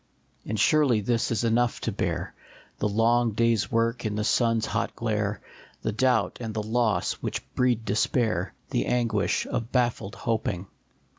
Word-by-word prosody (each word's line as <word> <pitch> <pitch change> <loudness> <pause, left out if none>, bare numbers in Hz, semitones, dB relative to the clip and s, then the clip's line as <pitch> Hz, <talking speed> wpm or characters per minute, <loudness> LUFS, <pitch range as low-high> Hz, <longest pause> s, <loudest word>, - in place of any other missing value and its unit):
1/3 - - -10
And 110 0 -1
surely 140 -5 +4
this 115 +2 0
is 115 -1 0
enough 120 +1 +2
to - - -1
bear, - - -2 0.5
The 105 - +1
long 115 +2 +2
day 115 +2 +3
s 105 -2 -1
work 115 +1 +1
in 105 -2 -2
the 105 - -1
sun 115 +1 +2
s 110 - -1
hot 115 +1 -2
glare, 105 -3 -1 0.4
The 110 - 0
doubt 125 +4 +1
and 110 -2 -5
the 110 - -1
loss 110 0 +1
which - - -4
breed 120 -3 +1
despair, 105 -2 0 0.2
The - - 0
anguish 120 -2 +1
of 115 +1 -3
baffled 120 -5 0
hoping. 110 -5 -2
115 Hz, 170 wpm, -26 LUFS, 105-120 Hz, 0.5 s, surely